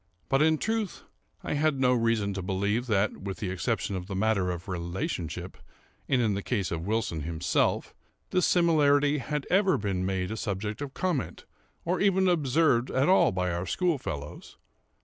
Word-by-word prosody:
But, 135 +1 +3
in 160 0 +4
truth, 220 +1 -2 0.4
I - - -2
had 150 -1 +1
no 125 -1 +4
reason 115 -4 +1
to 95 - -4
believe 100 +6 -1
that 105 -2 +1
(with 95 0 -6
the 95 -4 -3
exception 90 +2 -2
of 90 -1 -5
the 100 - -5
matter 100 -2 +1
of 90 +1 -5
relationship, 85 -1 -4 0.5
and 130 - +3
in 110 -4 +2
the 100 - -2
case 100 -4 -2
of 85 +1 -3
Wilson 105 -7 -1
himself,) 85 +2 0 0.4
this 185 -1 +3
similarity 150 -4 +3
had 150 +2 -3
ever 190 0 +4
been 100 -3 -2
made 95 0 -1
a 110 - -4
subject 105 +2 -3
of 140 -2 -6
comment, 175 -8 -2 0.4
or 180 +2 0
even 190 -1 +3
observed 145 -6 +2
at 135 +5 +1
all 190 - +5
by 90 -1 -1
our 85 +2 -3
schoolfellows. 130 - -3
110 Hz, 170 wpm, -28 LUFS, 95-150 Hz, 0.5 s, all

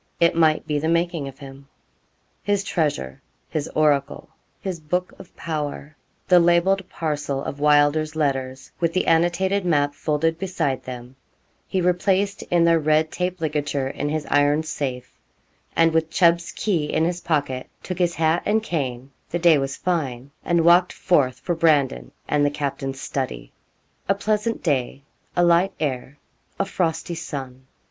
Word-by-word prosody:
It 170 0 +4
might 160 -2 +3
be 150 -2 -1
the 160 - -2
making 170 -3 0
of 135 -1 -10
him. 135 0 -12 0.7
His 205 -1 0
treasure 145 - -2 0.3
his 150 -2 -3
oracle 145 -3 +1 0.3
his 185 -3 -4
book 180 +4 -2
of 180 - -14
power, 150 -2 -4 0.3
the 180 -1 +6
labelled 175 +3 +3
parcel 145 -3 -3
of 140 - -5
Wylder's 150 +1 +3
letters, 135 -2 -2
with 170 -1 0
the 185 - +1
annotated 175 +4 +2
map 145 -5 +1
folded 160 +2 -1
beside 175 -8 -2
them 125 0 -8 0.5
he 190 - -1
replaced 190 +3 +1
in 175 -1 +3
their 165 -1 +4
red 155 +1 +2
taped 180 -1 -3
ligature 145 -3 -1
in 145 +1 -3
his 155 0 -2
iron 145 +2 +3
safe, 140 -6 -4 0.6
and 165 -1 +4
with 160 0 +1
Chubb's 170 0 +3
key 175 -8 -1
in 155 +2 0
his 175 +1 -2
pocket, 145 -6 -1
took 185 -1 -5
his 175 -1 +1
hat 160 +1 +2
and 215 +1 +1
cane 135 - -3 0.2
the 175 - -1
day 165 -3 +5
was 135 0 -3
fine 140 -7 -2
and 170 -2 +2
walked 175 +1 +5
forth 140 -9 +1
for 175 - -1
Brandon 145 - +2 0.2
and 150 -1 +2
the 145 - +3
captain's 135 -2 -4
study. 130 - -4 0.6
A 195 - +4
pleasant 215 +2 -1
day, 135 -3 -1 0.3
a 175 - +3
light 175 +3 +3
air, 135 -2 -3 0.4
a 195 - +1
frosty 175 -3 -2
sun. 130 -5 -7
155 Hz, 155 wpm, -23 LUFS, 140-175 Hz, 0.7 s, the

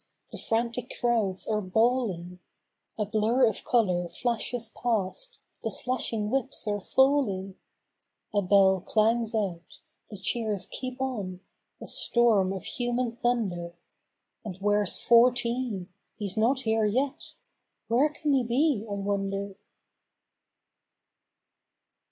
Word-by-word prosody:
The - - -7
frantic 235 +2 -2
crowds 225 -6 +1
are 215 -1 0
bawl¬ 230 +4 +2
ing; 175 +1 -9
\ - - -51
\ - - -52
\ - - -54
\ - - -54
\ - - -54
\. - - -44
A 210 - 0
blur 220 +5 +2
of 220 -4 -1
color 180 -8 +1
flashes 235 0 -2
past, 240 - -2 0.3
the - - -1
slashing 230 -4 -2
whips 260 -4 -1
are 205 0 0
falling, 215 -6 +2 0.8
A 205 - +3
bell 190 -1 +4
clangs 225 +3 +1
out; 185 -6 -3 0.3
the 205 - -8
cheers 210 0 -1
keep 255 0 -5
on, 205 -9 -3 0.4
a - - -8
storm 220 -6 +2
of 190 -1 -5
human 245 -1 -2
thunder; 190 -9 -1 0.7
And 195 -5 -6
where's 205 -1 +1
Fourteen? 240 -4 +2 0.3
He's 205 -4 -3
not 240 +5 +2
here 220 -2 +1
yet—where 260 +1 -2
can 300 -1 -1
he 265 -2 +3
be, 245 0 +1
I - - -3
wonder? 200 0 -2
220 Hz, 130 wpm, -27 LUFS, 195-245 Hz, 0.8 s, bell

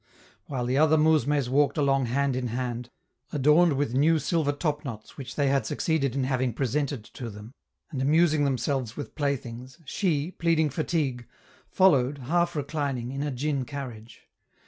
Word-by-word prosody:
While 130 -4 -2
the 130 +3 +1
other 155 0 +5
mousmes 150 -3 +3
walked 140 +4 +2
along 135 -3 +2
hand 135 +2 0
in 125 -1 -2
hand, 120 0 -3 0.4
adorned 150 +3 +4
with 135 -3 -1
new 155 +5 +4
silver 155 -2 +1
topknots 145 -7 -4
which 130 -3 -8
they 145 -2 +1
had 140 0 +1
succeeded 140 -6 0
in 135 - 0
having 130 -2 0
presented 140 -1 -1
to 120 +2 -8
them, 105 +3 -11 0.4
and 135 -4 -3
amusing 155 +2 +3
themselves 130 -3 -1
with 145 - -6
playthings, 130 -2 -3
she, 160 0 -1
pleading 165 -4 +1
fatigue, 140 -5 -1 0.4
followed, 145 -8 +3
half 170 +6 0
reclining, 140 -4 -2
in 135 +1 -4
a 150 - -1
djin 140 +1 -1
carriage. 120 -4 -8
140 Hz, 155 wpm, -27 LUFS, 125-150 Hz, 0.4 s, other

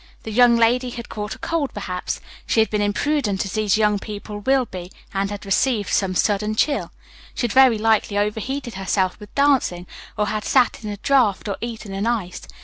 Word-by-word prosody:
The 220 - -6
young 240 +1 +5
lady 245 +2 +3
had 235 -1 -8
caught 210 0 -5
a - - -15
cold, 330 -5 -2
perhaps; 185 -3 -4 0.3
she - - +2
had 220 - +3
been 210 -1 0
imprudent, 205 0 0
as 195 - -5
these 215 -2 +2
young 210 -1 +2
people 210 0 -7
will 265 +4 +2
be, 180 -3 -8 0.2
and 195 0 0
had 205 0 -7
received 210 +1 +1
some 190 -2 +1
sudden 210 +2 +1
chill. 285 +6 0 0.4
She - - -3
had 240 - 0
very 260 -4 +6
likely 215 -1 +1
overheated 225 +5 -2
herself 190 0 -1
with 210 -1 -13
dancing, 270 -11 +2 0.3
or 210 - +2
had 210 0 -2
sat 250 -3 +2
in 210 - -4
a 205 - -5
draught, 230 -5 +2
or 200 - -2
eaten 225 -4 -6
an 195 +3 -2
ice. 210 -7 -2
215 Hz, 200 wpm, -22 LUFS, 200-240 Hz, 0.4 s, very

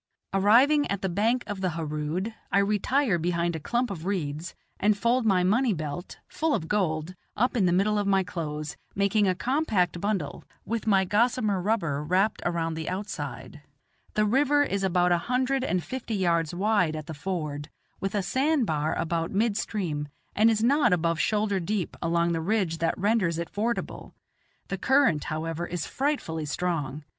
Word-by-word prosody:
Arriving 245 +10 +5
at 200 -1 -2
the - - +2
bank 225 +7 +1
of 205 -3 -5
the 185 -3 0
Harood, 160 +6 -3 0.2
I - - +3
retire 210 +2 +2
behind 170 0 0
a - - -3
clump 240 +8 -1
of 165 -5 -6
reeds, 170 -3 -3 0.2
and 210 0 +3
fold 235 +3 +2
my 185 -3 +3
money 225 +5 +3
belt, 155 +1 -5
full 315 -2 0
of 160 - -3
gold, 175 -4 0 0.2
up 245 +4 +1
in 200 -6 +3
the - - +3
middle 205 +4 +2
of 205 - -1
my 195 -1 +3
clothes, 155 -4 -5 0.2
making 200 +1 +2
a 185 - +2
compact 200 - 0
bundle, 200 -8 -2 0.2
with 225 0 -3
my 195 -2 +4
gossamer 210 -1 +1
rubber 170 -9 0
wrapped 185 +7 +1
around 165 -1 -1
the 160 0 -4
outside. 150 -8 -5 0.5
The 215 - +3
river 290 +6 +3
is 200 -8 -1
about 180 -1 +2
a 175 - +3
hundred 260 +1 +1
and 180 -9 0
fifty 235 - -4
yards 170 -4 +1
wide 185 -3 +1
at 155 -1 -5
the 160 - -6
ford, 150 -3 -4 0.3
with 195 +1 -3
a 200 - +1
sand 275 - +1
bar 155 -3 0
about 165 0 -1
mid 215 +1 +1
stream, 165 -9 -2 0.3
and 220 +2 +5
is 220 -1 +1
not 280 -2 +4
above 165 -2 +1
shoulder 210 +2 +1
deep 185 +1 -2
along 170 0 +1
the 165 -1 -1
ridge 180 -3 0
that 165 0 0
renders 200 -4 +1
it 170 0 -4
fordable; 230 +3 -3 0.5
the 195 - -3
current, 265 - +3
however, 165 +2 -3
is 175 -2 -3
frightfully 260 - -2
strong. 150 -3 -2
190 Hz, 175 wpm, -27 LUFS, 165-215 Hz, 0.5 s, Arriving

